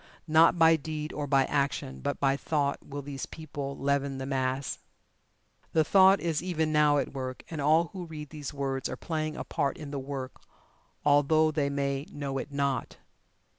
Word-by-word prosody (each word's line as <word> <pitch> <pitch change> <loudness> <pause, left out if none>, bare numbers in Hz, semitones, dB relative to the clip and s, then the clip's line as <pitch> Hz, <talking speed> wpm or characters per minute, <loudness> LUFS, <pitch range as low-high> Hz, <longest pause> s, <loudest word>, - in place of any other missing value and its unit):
Not 160 +2 +5
by 165 -1 +6
deed, 155 0 -5
or 145 -1 -3
by 135 -1 +4
action, 140 - -1
but - - -2
by 135 -1 +3
Thought, 140 0 -1
will 145 0 -7
these 140 -1 -5
people 145 -3 -6
leaven 140 0 0
the 135 - -4
mass. 130 0 -1 0.9
The 160 - +4
Thought 190 +4 +6
is 165 -3 -1
even 160 -3 -1
now 150 -1 +4
at 140 - -1
work, 130 -1 -5
and 155 -3 -3
all 160 +3 +4
who 180 -3 -6
read 150 -3 -8
these 150 -3 -6
words 135 -2 -2
are - - -4
playing 155 -1 -3
a - - -3
part 140 -1 -1
in 150 -2 -8
the 140 - -3
work, 135 -1 -6 0.6
although 150 +2 +4
they 145 -2 0
may 140 0 -2
know 140 -2 -3
it 145 - -6
not. 140 -3 -1
145 Hz, 180 wpm, -29 LUFS, 140-155 Hz, 0.9 s, by